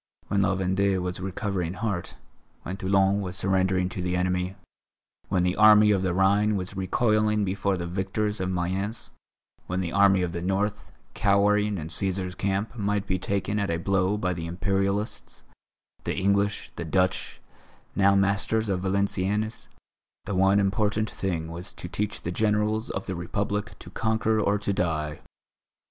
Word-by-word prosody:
When 100 0 +2
La 95 0 +2
Vendée 95 +1 +1
was 90 0 -3
recovering 95 -2 -2
heart, 95 -3 -3 0.5
when 90 - -4
Toulon 95 +1 +2
was 90 -1 -5
surrendering 95 -1 +1
to 90 - -5
the 90 0 -1
enemy, 90 +1 -1 0.7
when 95 -2 +2
the 90 +1 +1
army 105 0 +7
of 100 -2 +2
the 95 -1 0
Rhine 100 +3 +3
was 95 0 -3
recoiling 105 +2 +1
before 95 0 0
the 85 - -3
victors 95 +4 -2
of 95 0 -1
Mayence, 95 +5 -2 0.6
when 90 +1 -1
the 90 -2 -2
Army 95 -1 +4
of 90 - -2
the 85 0 -4
North, 95 +2 -1 0.2
cowering 105 0 +2
in 80 -2 -5
Cæsar's 95 0 -1
Camp, 100 +5 -2
might 105 -2 -1
be 95 -1 -1
taken 100 +2 -1
at 100 - -1
a 85 - 0
blow 95 +3 +1
by 90 -3 -1
the 85 -1 -5
Imperialists, 100 +4 -2 0.6
the - - -2
English, 100 +2 +1
the - - -3
Dutch, 90 +3 0 0.6
now 100 0 +4
masters 100 +3 +1
of 95 -2 0
Valenciennes, 100 +2 -1 0.6
the 105 - -3
one 95 +2 +4
important 105 +2 0
thing 85 -4 -3
was 85 +3 -7
to - - -8
teach 105 +3 -3
the 85 - -2
Generals 105 +2 +1
of 95 - -4
the 95 - -3
Republic 100 +4 -3
to - - -12
conquer 110 0 +1
or 105 -1 +2
to 100 -1 -2
die. 80 -5 -1
95 Hz, 160 wpm, -26 LUFS, 90-105 Hz, 0.7 s, army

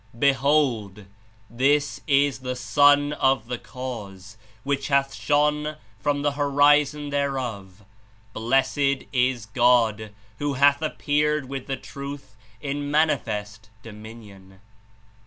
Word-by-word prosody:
"Behold! 130 -7 +1 0.4
This 140 +5 0
is 140 -1 +2
the 125 -1 -4
Sun 145 +5 +3
of 135 -5 +1
the 125 0 -5
Cause, 105 -6 -8 0.3
which 140 -1 -2
hath 140 -1 +1
shone 150 +1 0 0.2
from 145 -1 -1
the 145 - +2
Horizon 145 +1 +2
thereof. 120 -9 -3 0.5
Blessed 135 +3 0
is 125 -3 +1
God, 115 -2 +2 0.3
who 145 -1 -1
hath 140 +2 +4
appeared 150 -2 0
with 135 0 -6
the 135 -1 -3
Truth 140 -6 -9 0.2
in 145 +2 -4
manifest 110 -8 -1
dominion." 105 -3 -13
135 Hz, 105 wpm, -24 LUFS, 115-145 Hz, 0.5 s, hath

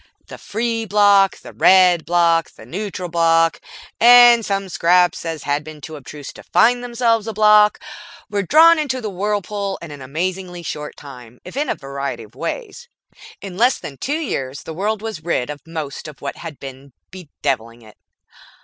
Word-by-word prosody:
The - - -11
Free 230 +1 -2
Bloc, 200 -1 +4
the - - -13
Red 180 -3 +4
Bloc, 170 -1 +2
the - - -16
Neutral 190 -1 -5
Bloc 165 -1 +2 0.4
and 240 0 +7
such 195 -2 -3
scraps 180 +1 +2
as 165 -2 -5
had 145 +1 -1
been 155 0 -11
too 155 +2 -9
obtuse 145 0 -10
to - - -13
find 245 +1 +2
themselves 235 -2 0
a 225 - -3
Bloc 210 0 +5 0.5
were 205 -1 -2
drawn 320 - +6
into 265 -4 -2
the 215 -4 -5
whirlpool 200 0 -3
in 170 -3 -10
an 145 -2 -10
amazingly 175 +5 -4
short 150 -2 -6
time, 125 -4 -13
if 180 - -10
in 285 +1 -1
a - - 0
variety 140 0 -6
of - - -17
ways. 485 0 -6 0.5
In 190 -2 -8
less 245 +3 +3
than 140 - -9
two 285 - -3
years 140 - -4
the 160 - -7
world 210 +5 -2
was 215 -8 -6
rid 150 -5 -1
of 145 -1 -9
most 155 -4 -6
of 150 - -12
what 140 - -6
had 165 -4 -9
been 135 0 -11 0.2
bedeviling 135 -9 -5
it. 110 -1 -18
180 Hz, 175 wpm, -19 LUFS, 150-215 Hz, 0.5 s, and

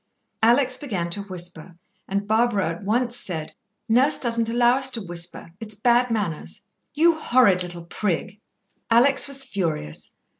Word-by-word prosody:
Alex 250 +3 +4
began 195 -12 -4
to 200 - -3
whisper, 175 -3 -7 0.3
and 200 +1 -2
Barbara 220 -4 +2
at 165 +4 -6
once 240 +4 0
said: 160 -8 -4 0.3
"Nurse 255 +6 +3
doesn't 230 -2 0
allow 240 +1 +3
us 270 -1 +2
to 255 - -3
whisper. 170 -1 -4
It's 215 -2 -5
bad 240 +3 +2
manners." 165 - -3 0.3
"You 325 +1 +3
horrid 240 -10 +3
little 175 -1 -7
prig!" 195 +2 -3 0.5
Alex 250 +6 +4
was 275 -1 -2
furious. 160 - -4
215 Hz, 145 wpm, -23 LUFS, 175-245 Hz, 0.5 s, Alex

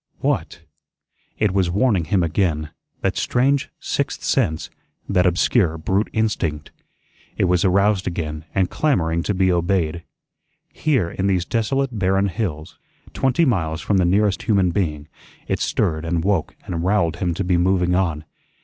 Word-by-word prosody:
What! 85 - -2 0.7
It 105 -3 +2
was 95 -2 +1
warning 100 -2 +2
him 90 +2 +1
again, 80 -3 0 0.3
that - - 0
strange 135 +3 +1
sixth - - -2
sense, 80 0 0 0.4
that 90 0 +3
obscure 90 -1 +2
brute 95 +6 0
instinct. 85 -9 -1 0.7
It - - +1
was 90 -1 +2
aroused 100 +1 +2
again 80 -3 -4
and 95 -2 +2
clamoring 85 - 0
to 100 +4 -2
be 95 0 +3
obeyed. 85 -2 0 0.7
Here, 130 - 0
in 95 - -1
these 90 -3 +1
desolate 120 +2 -1
barren 95 +1 +2
hills, 85 -4 -4 0.3
twenty 135 +5 +2
miles 80 - 0
from 100 - +1
the 90 - +3
nearest 100 +2 +2
human 100 -6 +2
being, 75 -5 -2 0.4
it - - -1
stirred 80 0 0
and 85 0 -1
woke 95 -4 0
and 85 -2 -3
rowelled 90 -3 +1
him 85 -2 -1
to 100 - -2
be 90 -1 +1
moving 90 0 +2
on. 85 -4 0
90 Hz, 150 wpm, -21 LUFS, 85-100 Hz, 0.7 s, that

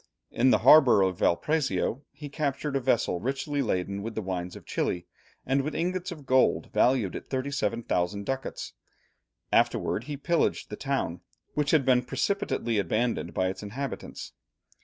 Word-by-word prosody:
In 130 +3 +3
the - - +5
harbour 135 -10 +8
of 95 -2 -1
Valparaiso 135 - +1
he 145 - -9
captured 145 -1 -2
a - - +3
vessel 120 -8 +1
richly 140 - -2
laden 100 -4 -1
with 110 +1 -5
the 110 - -3
wines 90 -1 -4
of - - -11
Chili, 85 -1 -2 0.4
and 135 +1 +2
with 150 +3 -4
ingots 180 +2 -2
of 155 -5 -9
gold 130 0 +2
valued 125 -7 +2
at - - -8
37,000 115 -8 -1
ducats; 135 0 -4 0.8
afterwards 120 - +1
he 145 -1 -4
pillaged 170 +4 0
the - - -3
town, 135 - -2 0.3
which 150 -1 0
had 150 -5 +3
been 125 -2 +4
precipitately 125 - -1
abandoned 110 -3 -1
by 95 0 +1
its 95 0 -6
inhabitants. 125 +7 -6
130 Hz, 155 wpm, -28 LUFS, 100-140 Hz, 0.8 s, harbour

